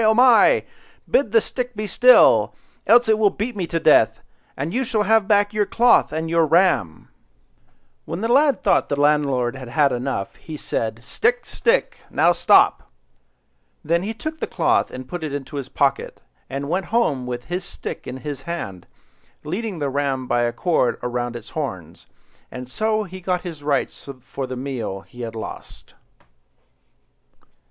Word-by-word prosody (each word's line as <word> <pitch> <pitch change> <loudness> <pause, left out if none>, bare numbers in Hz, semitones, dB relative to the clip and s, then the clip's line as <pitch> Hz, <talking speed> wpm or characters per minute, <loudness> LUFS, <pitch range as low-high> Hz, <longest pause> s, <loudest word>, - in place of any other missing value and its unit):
oh 220 0 +4
my! 250 - +5 0.4
bid 265 -6 +1
the 225 - +5
stick 250 +2 -5
be 215 +1 -3
still, 250 +5 +5 0.3
else 240 0 +6
it 220 -1 +3
will 210 -2 +4
beat 220 +4 -4
me 185 -4 -3
to 165 - -1
death, - - +3 0.3
and 150 +6 -3
you 260 - 0
shall 225 -4 0
have 220 0 +3
back 205 0 +3
your 210 0 +2
cloth 240 +1 +3
and 160 +1 -3
your 165 0 +2
ram, 155 - +1 1.0
When 170 +4 -5
the 225 - 0
lad 275 +2 +3
thought - - +2
the 145 - -1
landlord 140 -4 +1
had 130 -1 -9
got 145 -2 +4
enough, 120 -6 -3
he 155 -2 -9
said— 115 -4 -3
"Stick, 450 - 0
stick! - - 0
now - - +3
stop!" - - +3 0.9
Then 170 +2 +1
he 215 +4 -4
took 315 +6 -6
the - - -3
cloth - - +1
and 130 0 -9
put 175 +3 -6
it 150 -3 -4
into 145 +1 -6
his 135 -2 -5
pocket, 140 -1 -1 0.3
and 140 +2 -4
went 180 +4 -2
home 155 - 0
with 120 0 -5
his 175 +2 -4
stick - - -8
in 130 - -6
his 145 -3 -5
hand, 95 - -6 0.6
leading 190 +5 -4
the 145 -3 -2
ram 135 -2 -1
by 120 -1 0
a 120 0 +1
cord 125 -2 0
round 120 -1 -3
its 115 -2 -9
horns; 95 - -6 0.4
and 125 0 -9
so 215 +3 0
he 185 -1 -10
got 180 0 -1
his 165 -5 -8
rights 145 -1 -2
for 130 +1 -6
the 130 - -5
meal 125 -7 -4
he 95 +7 -13
had 115 -1 -6
lost. 110 - -9
155 Hz, 175 wpm, -21 LUFS, 130-215 Hz, 1.0 s, else